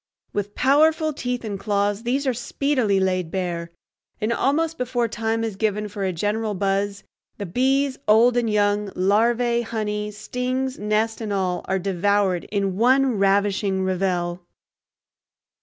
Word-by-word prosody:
With 205 Hz, 0 st, -3 dB
powerful 310 Hz, +3 st, +3 dB
teeth 250 Hz, -4 st, -3 dB
and 200 Hz, -2 st, -4 dB
claws 205 Hz, 0 st, 0 dB
these 260 Hz, +4 st, -1 dB
are 260 Hz, -, +2 dB
speedily 245 Hz, -4 st, 0 dB
laid 185 Hz, -3 st, 0 dB
bare, 170 Hz, -2 st, -3 dB, 0.5 s
and 220 Hz, +2 st, 0 dB
almost 320 Hz, +6 st, 0 dB
before 245 Hz, -1 st, 0 dB
time 225 Hz, 0 st, -2 dB
is 220 Hz, -3 st, -3 dB
given 210 Hz, 0 st, -1 dB
for 205 Hz, -1 st, -5 dB
a 190 Hz, -, 0 dB
general 210 Hz, +4 st, -1 dB
buzz 200 Hz, +1 st, -1 dB, 0.3 s
the 200 Hz, -, -4 dB
bees, 265 Hz, +7 st, +1 dB
old 230 Hz, +3 st, +5 dB
and 240 Hz, -2 st, +1 dB
young, 205 Hz, -1 st, +1 dB
larvae, 235 Hz, +5 st, +2 dB
honey, 210 Hz, -2 st, -3 dB
stings, 255 Hz, +5 st, -3 dB
nest, 215 Hz, +2 st, 0 dB
and 215 Hz, -2 st, -4 dB
all, 185 Hz, -3 st, -1 dB
are 190 Hz, -, 0 dB
devoured 195 Hz, 0 st, +1 dB
in 195 Hz, -2 st, -2 dB
one 255 Hz, 0 st, +3 dB
ravishing 195 Hz, -1 st, +2 dB
revel. 180 Hz, -2 st, -1 dB
210 Hz, 140 wpm, -23 LUFS, 195-245 Hz, 0.5 s, old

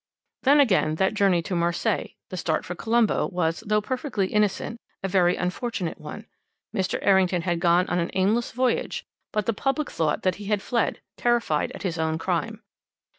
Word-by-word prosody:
"Then, 285 Hz, +2 st, +5 dB
again, 190 Hz, -, +3 dB
that 190 Hz, +4 st, +1 dB
journey 195 Hz, -5 st, +3 dB
to 185 Hz, -, -4 dB
Marseilles, 170 Hz, 0 st, 0 dB
the -, -, -5 dB
start 160 Hz, -3 st, -1 dB
for 175 Hz, -, -4 dB
Colombo, 225 Hz, +4 st, +1 dB
was, 165 Hz, -3 st, -1 dB
though 210 Hz, 0 st, +3 dB
perfectly 250 Hz, -3 st, -2 dB
innocent, 210 Hz, +2 st, 0 dB, 0.2 s
a -, -, +1 dB
very 180 Hz, -2 st, +3 dB
unfortunate 180 Hz, -1 st, -3 dB
one. 175 Hz, +8 st, -8 dB, 0.5 s
Mr. 190 Hz, -3 st, 0 dB
Errington 190 Hz, -3 st, +3 dB
had 175 Hz, -2 st, 0 dB
gone 175 Hz, +1 st, +4 dB
on 180 Hz, -, 0 dB
an 170 Hz, -, -1 dB
aimless 210 Hz, +5 st, +1 dB
voyage, 255 Hz, +1 st, 0 dB, 0.3 s
but 210 Hz, -1 st, -1 dB
the 230 Hz, -, +1 dB
public 270 Hz, +7 st, -1 dB
thought 155 Hz, -2 st, 0 dB
that 185 Hz, -2 st, +1 dB
he -, -, -7 dB
had 205 Hz, -1 st, 0 dB
fled, 235 Hz, -3 st, 0 dB, 0.2 s
terrified 235 Hz, -11 st, +1 dB
at -, -, -8 dB
his 170 Hz, -4 st, -2 dB
own 160 Hz, 0 st, 0 dB
crime. -, -, -2 dB
190 Hz, 180 wpm, -25 LUFS, 175-225 Hz, 0.5 s, Then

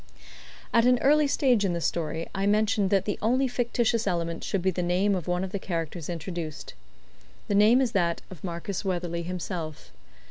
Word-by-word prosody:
At 230 Hz, +1 st, +5 dB
an 250 Hz, 0 st, +5 dB
early 295 Hz, +3 st, +4 dB
stage 255 Hz, -6 st, +2 dB
in 190 Hz, -3 st, +1 dB
the 170 Hz, -, -1 dB
story 165 Hz, -1 st, -2 dB
I 195 Hz, 0 st, -1 dB
mentioned 210 Hz, -1 st, +2 dB
that 195 Hz, -2 st, +2 dB
the 205 Hz, -, -2 dB
only 255 Hz, +5 st, +2 dB
fictitious 235 Hz, -2 st, 0 dB
element 170 Hz, -2 st, -2 dB
should 190 Hz, -3 st, -1 dB
be 190 Hz, -, +3 dB
the 180 Hz, -, -2 dB
name 180 Hz, +4 st, +2 dB
of 180 Hz, -4 st, -3 dB
one 180 Hz, +1 st, 0 dB
of 190 Hz, -, -4 dB
the 200 Hz, -, -2 dB
characters 165 Hz, -3 st, -4 dB
introduced. 170 Hz, -2 st, -5 dB, 0.7 s
The -, -, -1 dB
name 215 Hz, +5 st, +6 dB
is 250 Hz, -4 st, +1 dB
that 170 Hz, -5 st, 0 dB
of 180 Hz, -, -11 dB
Marcus 175 Hz, +2 st, -4 dB
Weatherley 175 Hz, -3 st, -2 dB
himself. 170 Hz, -, -5 dB
190 Hz, 185 wpm, -27 LUFS, 170-215 Hz, 0.7 s, name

